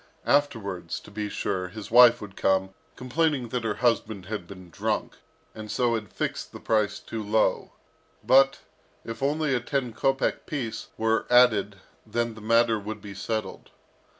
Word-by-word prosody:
Afterwards, 100 Hz, -, 0 dB
to 105 Hz, -, -15 dB
be 105 Hz, 0 st, -4 dB
sure, 90 Hz, -2 st, -2 dB
his 110 Hz, +3 st, -9 dB
wife 120 Hz, 0 st, +7 dB
would 100 Hz, -2 st, -9 dB
come, 95 Hz, 0 st, +1 dB, 0.2 s
complaining 130 Hz, -1 st, 0 dB
that 125 Hz, 0 st, -2 dB
her 110 Hz, -2 st, -1 dB
husband 110 Hz, -5 st, 0 dB
had 105 Hz, -3 st, -5 dB
been 95 Hz, -3 st, -12 dB
drunk, -, -, -2 dB, 0.4 s
and 110 Hz, -1 st, -9 dB
so 120 Hz, +1 st, +1 dB
had 105 Hz, -4 st, -4 dB
fixed -, -, -4 dB
the -, -, -9 dB
price 105 Hz, -2 st, +1 dB
too 115 Hz, -, -6 dB
low; 110 Hz, +1 st, +1 dB, 0.5 s
but, 135 Hz, +1 st, +5 dB, 0.4 s
if 115 Hz, +1 st, -7 dB
only 150 Hz, +1 st, +1 dB
a 125 Hz, -, +2 dB
ten 125 Hz, -1 st, -2 dB
kopek 135 Hz, +4 st, 0 dB
piece 130 Hz, -7 st, -4 dB
were 110 Hz, 0 st, +1 dB
added 110 Hz, -5 st, +5 dB, 0.3 s
then 115 Hz, +1 st, -2 dB
the 110 Hz, -, -12 dB
matter 115 Hz, 0 st, +3 dB
would 105 Hz, +2 st, -6 dB
be 100 Hz, -1 st, -9 dB
settled. 100 Hz, 0 st, -4 dB
110 Hz, 160 wpm, -26 LUFS, 105-125 Hz, 0.5 s, wife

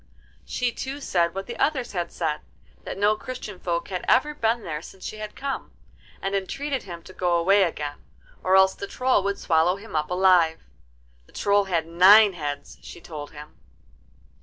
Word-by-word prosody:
She 245 Hz, -1 st, -1 dB
too 270 Hz, +4 st, -5 dB
said 170 Hz, -10 st, 0 dB
what 195 Hz, 0 st, -4 dB
the 240 Hz, -, -7 dB
others 265 Hz, -5 st, 0 dB
had 175 Hz, -3 st, -3 dB
said, 155 Hz, -3 st, -2 dB, 0.5 s
that -, -, -5 dB
no 205 Hz, +2 st, +3 dB
Christian 215 Hz, -4 st, -7 dB
folk 170 Hz, -1 st, -2 dB
had 185 Hz, -2 st, -4 dB
ever 300 Hz, +4 st, +3 dB
been 230 Hz, -4 st, 0 dB
there 155 Hz, -3 st, -4 dB
since 190 Hz, +2 st, -12 dB
she 215 Hz, -, -5 dB
had 215 Hz, 0 st, -7 dB
come, 275 Hz, 0 st, -5 dB, 0.5 s
and 195 Hz, -, -2 dB
entreated 265 Hz, +8 st, -2 dB
him 170 Hz, -3 st, -9 dB
to 185 Hz, -, -13 dB
go 175 Hz, -2 st, +1 dB
away 195 Hz, +4 st, +4 dB
again, 150 Hz, -5 st, -2 dB, 0.4 s
or 185 Hz, +1 st, +3 dB
else 190 Hz, 0 st, +6 dB
the 200 Hz, -, -7 dB
Troll 255 Hz, -2 st, +1 dB
would 200 Hz, +1 st, -1 dB
swallow 165 Hz, +2 st, +2 dB
him 200 Hz, -2 st, -10 dB
up 150 Hz, 0 st, 0 dB
alive. 180 Hz, -3 st, +3 dB, 0.6 s
The -, -, -23 dB
Troll 200 Hz, 0 st, +2 dB
had 170 Hz, -4 st, 0 dB
nine 190 Hz, +5 st, +7 dB
heads, 145 Hz, -4 st, -6 dB
she -, -, -11 dB
told 150 Hz, -3 st, -8 dB
him. 150 Hz, 0 st, -13 dB
190 Hz, 185 wpm, -25 LUFS, 170-215 Hz, 0.6 s, nine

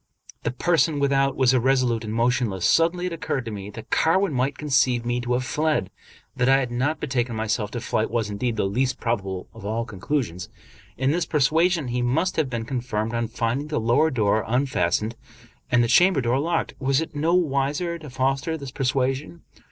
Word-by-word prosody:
The -, -, -1 dB
person 160 Hz, +2 st, +1 dB
without 140 Hz, -1 st, +2 dB
was 130 Hz, -1 st, +3 dB
irresolute 125 Hz, -2 st, +2 dB
and 110 Hz, -, -5 dB
motionless. 115 Hz, -5 st, 0 dB
Suddenly 170 Hz, -, +3 dB
it 180 Hz, -, -3 dB
occurred 135 Hz, -5 st, -3 dB
to 115 Hz, -, -5 dB
me 100 Hz, -1 st, -6 dB
that 110 Hz, +1 st, -11 dB
Carwin 185 Hz, +1 st, +2 dB
might 130 Hz, +2 st, 0 dB
conceive 130 Hz, -5 st, +1 dB
me 120 Hz, +1 st, -1 dB
to 120 Hz, 0 st, -1 dB
have 125 Hz, +1 st, 0 dB
fled. 150 Hz, -7 st, 0 dB, 0.4 s
That 125 Hz, +1 st, +2 dB
I 135 Hz, -, +6 dB
had 130 Hz, -3 st, -2 dB
not 140 Hz, +6 st, -1 dB
betaken 125 Hz, -4 st, -1 dB
myself 110 Hz, -1 st, -1 dB
to 120 Hz, +1 st, -5 dB
flight 110 Hz, +1 st, -1 dB
was, 115 Hz, -2 st, -1 dB
indeed, 115 Hz, +3 st, -2 dB
the 105 Hz, -, 0 dB
least 125 Hz, +6 st, 0 dB
probable 95 Hz, -6 st, -2 dB
of 115 Hz, -, -12 dB
all 110 Hz, +3 st, -2 dB
conclusions. 100 Hz, -, -3 dB, 0.5 s
In 130 Hz, +2 st, +1 dB
this 170 Hz, +1 st, 0 dB
persuasion 160 Hz, +1 st, +2 dB
he 125 Hz, +1 st, -1 dB
must 160 Hz, +10 st, 0 dB
have 155 Hz, -4 st, +1 dB
been 115 Hz, -2 st, -3 dB
confirmed 115 Hz, -3 st, -3 dB
on 115 Hz, -1 st, -1 dB
finding 120 Hz, +6 st, -2 dB
the 150 Hz, -, -1 dB
lower 120 Hz, +8 st, +3 dB
door 110 Hz, -5 st, +1 dB
unfastened 115 Hz, -4 st, 0 dB, 0.5 s
and 120 Hz, -1 st, +4 dB
the -, -, +1 dB
chamber 175 Hz, +7 st, +5 dB
door 120 Hz, +2 st, +1 dB
locked. 165 Hz, +3 st, -1 dB
Was 135 Hz, 0 st, +2 dB
it 160 Hz, -1 st, -5 dB
not 165 Hz, +4 st, +2 dB
wise 140 Hz, -4 st, 0 dB
to 170 Hz, -4 st, -4 dB
foster 135 Hz, +5 st, -1 dB
this 140 Hz, -3 st, -8 dB
persuasion? 135 Hz, +5 st, -1 dB
130 Hz, 190 wpm, -24 LUFS, 115-145 Hz, 0.5 s, I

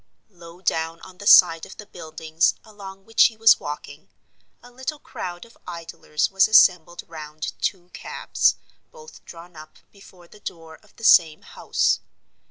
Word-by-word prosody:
Low 170 Hz, -1 st, -15 dB
down 165 Hz, -2 st, -2 dB
on 185 Hz, -1 st, -15 dB
the 205 Hz, -, -7 dB
side 165 Hz, -5 st, +6 dB
of 195 Hz, -, -11 dB
the 210 Hz, -, -11 dB
"Buildings" 160 Hz, -2 st, -2 dB
along 195 Hz, -2 st, -13 dB
which 225 Hz, 0 st, +4 dB
he 220 Hz, -, 0 dB
was 225 Hz, 0 st, +5 dB
walking, 145 Hz, 0 st, -9 dB, 0.5 s
a 245 Hz, -, -16 dB
little 260 Hz, +5 st, -6 dB
crowd 175 Hz, -9 st, -8 dB
of 230 Hz, -, -21 dB
idlers 165 Hz, -2 st, -4 dB
was 195 Hz, 0 st, +3 dB
assembled 175 Hz, -5 st, +4 dB
round 155 Hz, -1 st, -8 dB
two 180 Hz, -2 st, -3 dB
cabs, -, -, -1 dB, 0.4 s
both 470 Hz, -1 st, -15 dB
drawn 170 Hz, 0 st, -13 dB
up 155 Hz, 0 st, -14 dB
before 185 Hz, -3 st, -18 dB
the 210 Hz, -, -18 dB
door 165 Hz, -4 st, -10 dB
of 210 Hz, -, -27 dB
the 225 Hz, -, -16 dB
same 165 Hz, -7 st, +4 dB
house. -, -, -1 dB
175 Hz, 160 wpm, -22 LUFS, 165-205 Hz, 0.5 s, side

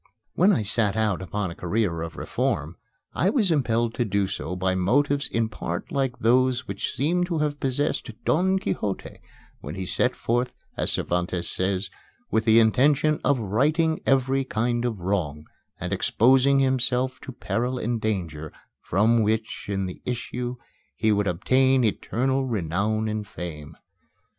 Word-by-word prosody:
When 190 Hz, +4 st, +4 dB
I 165 Hz, -, +1 dB
set 105 Hz, 0 st, +1 dB
out 105 Hz, -4 st, +1 dB
upon 95 Hz, +1 st, -3 dB
a -, -, -9 dB
career 90 Hz, -2 st, -1 dB
of 85 Hz, 0 st, -5 dB
reform, 80 Hz, +4 st, -2 dB, 0.4 s
I 180 Hz, -, +2 dB
was 210 Hz, -6 st, +2 dB
impelled 120 Hz, -6 st, +1 dB
to 120 Hz, -, 0 dB
do 100 Hz, -2 st, 0 dB
so 90 Hz, -1 st, -4 dB
by 95 Hz, 0 st, 0 dB
motives 140 Hz, +10 st, +1 dB
in 115 Hz, -1 st, 0 dB
part 90 Hz, -5 st, -5 dB
like 135 Hz, -3 st, -1 dB
those 130 Hz, +2 st, +2 dB
which 100 Hz, 0 st, -3 dB
seem 170 Hz, +6 st, +1 dB
to 175 Hz, -2 st, -2 dB
have 150 Hz, -1 st, -1 dB
possessed 135 Hz, 0 st, -1 dB, 0.2 s
Don 190 Hz, +4 st, +2 dB
Quixote 105 Hz, -, -3 dB, 0.4 s
when 75 Hz, +4 st, -7 dB
he 95 Hz, 0 st, -4 dB
set -, -, +1 dB
forth, 120 Hz, +2 st, -1 dB, 0.2 s
as -, -, -1 dB
Cervantes 90 Hz, 0 st, -1 dB
says, 95 Hz, +1 st, -1 dB, 0.4 s
with 110 Hz, -, +1 dB
the 110 Hz, 0 st, +6 dB
intention 145 Hz, +7 st, +3 dB
"of 140 Hz, -, +3 dB
righting 150 Hz, -, +1 dB
every 135 Hz, 0 st, +2 dB
kind 120 Hz, 0 st, -1 dB
of 110 Hz, -6 st, -3 dB
wrong, 80 Hz, -6 st, -2 dB, 0.3 s
and -, -, -3 dB
exposing 135 Hz, +3 st, +4 dB
himself 130 Hz, -1 st, +1 dB
to 135 Hz, -, -8 dB
peril 125 Hz, +1 st, -2 dB
and 120 Hz, -1 st, -2 dB
danger, 85 Hz, -8 st, -3 dB, 0.3 s
from 110 Hz, +5 st, +2 dB
which 110 Hz, +1 st, -1 dB
in 95 Hz, -1 st, -1 dB
the 90 Hz, -, -7 dB
issue 125 Hz, 0 st, -4 dB, 0.4 s
he 110 Hz, +6 st, +1 dB
would 105 Hz, -1 st, +1 dB
obtain 130 Hz, +9 st, +3 dB
eternal 130 Hz, +4 st, 0 dB
renown 105 Hz, +1 st, -1 dB
and 105 Hz, -1 st, -3 dB
fame." 75 Hz, -4 st, -8 dB
115 Hz, 155 wpm, -25 LUFS, 95-130 Hz, 0.4 s, the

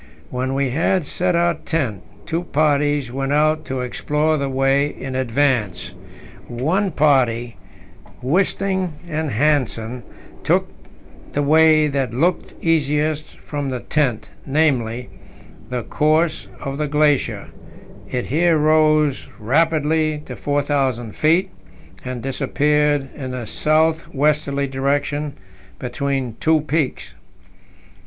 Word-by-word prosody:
When 130 Hz, +1 st, -2 dB
we 135 Hz, -2 st, 0 dB
had 165 Hz, +4 st, +1 dB
set 180 Hz, +4 st, 0 dB
our 170 Hz, 0 st, +3 dB
tent, 145 Hz, -, -2 dB, 0.2 s
two 165 Hz, +1 st, -1 dB
parties 145 Hz, -3 st, +1 dB
went 135 Hz, +1 st, -2 dB
out 155 Hz, +1 st, +2 dB
to 130 Hz, -1 st, -3 dB
explore 150 Hz, +5 st, 0 dB
the 140 Hz, -2 st, -1 dB
way 135 Hz, +2 st, +2 dB
in 135 Hz, -2 st, -7 dB
advance. 130 Hz, -5 st, 0 dB, 0.5 s
One 160 Hz, -, 0 dB
party 125 Hz, -, +2 dB, 0.6 s
Wisting 185 Hz, +4 st, 0 dB
and 155 Hz, -2 st, -2 dB
Hanssen 125 Hz, -3 st, 0 dB, 0.4 s
took -, -, +2 dB, 0.7 s
the 145 Hz, -, 0 dB
way 155 Hz, +1 st, +5 dB
that 135 Hz, -5 st, -1 dB
looked 170 Hz, +8 st, 0 dB
easiest 155 Hz, -1 st, 0 dB
from 145 Hz, -2 st, -4 dB
the 130 Hz, -1 st, -3 dB
tent 135 Hz, -7 st, -1 dB
namely, 125 Hz, -6 st, 0 dB, 0.6 s
the 125 Hz, -2 st, -3 dB
course 155 Hz, -4 st, +1 dB
of 135 Hz, +1 st, -5 dB
the 150 Hz, -, 0 dB
glacier; 150 Hz, -1 st, +1 dB, 0.6 s
it 125 Hz, -1 st, -2 dB
here 165 Hz, +4 st, +2 dB
rose 155 Hz, -2 st, +3 dB
rapidly 155 Hz, +4 st, +1 dB
to -, -, -7 dB
4,000 140 Hz, -5 st, -1 dB
feet, 170 Hz, +5 st, +2 dB, 0.5 s
and 125 Hz, -2 st, -5 dB
disappeared 145 Hz, +1 st, +1 dB
in 130 Hz, -3 st, -5 dB
a 125 Hz, -2 st, -5 dB
south 160 Hz, +6 st, +1 dB
westerly 145 Hz, -1 st, +1 dB
direction 140 Hz, +2 st, -1 dB, 0.4 s
between 130 Hz, -1 st, -3 dB
two 160 Hz, -1 st, +3 dB
peaks. 150 Hz, -2 st, -2 dB
145 Hz, 115 wpm, -20 LUFS, 130-155 Hz, 0.7 s, way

